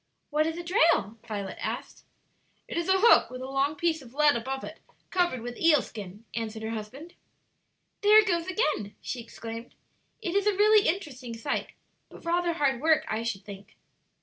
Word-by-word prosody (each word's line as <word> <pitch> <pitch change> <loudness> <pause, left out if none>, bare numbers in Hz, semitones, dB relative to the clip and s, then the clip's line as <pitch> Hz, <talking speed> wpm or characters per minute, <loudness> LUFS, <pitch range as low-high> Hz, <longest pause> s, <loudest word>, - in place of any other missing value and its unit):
"What 305 +1 +2
is 325 +1 -3
a 345 - -5
drail?" 330 - +2
Violet 200 -3 -5
asked. - - -5 0.6
"It - - -6
is 340 +2 -1
a 380 - +5
hook 465 - +6
with 255 0 -8
a - - -5
long 275 +2 0
piece 320 0 0
of 255 0 -15
lead 295 -1 +5
above 265 +3 -3
it - - -8 0.3
covered 350 -9 +1
with 245 0 -6
eel 315 -5 +5
skin," 205 +1 -9
answered 220 -1 -4
her 220 - -3
husband. 240 +10 -7 0.9
"There 420 +1 +7
it 430 -1 +6
goes 340 -2 0
again!" 305 - -1
she 255 - -5
exclaimed. 230 0 -9 0.4
"It 345 - -3
is 400 +1 +2
a 410 -2 +2
really 425 0 +5
interesting 270 -10 -3
sight, 225 - -3 0.4
but - - -14
rather 345 0 +1
hard 275 -6 +1
work, 315 0 +3
I 220 - -1
should 210 -4 -4
think." 200 0 -11
280 Hz, 185 wpm, -28 LUFS, 230-340 Hz, 0.9 s, There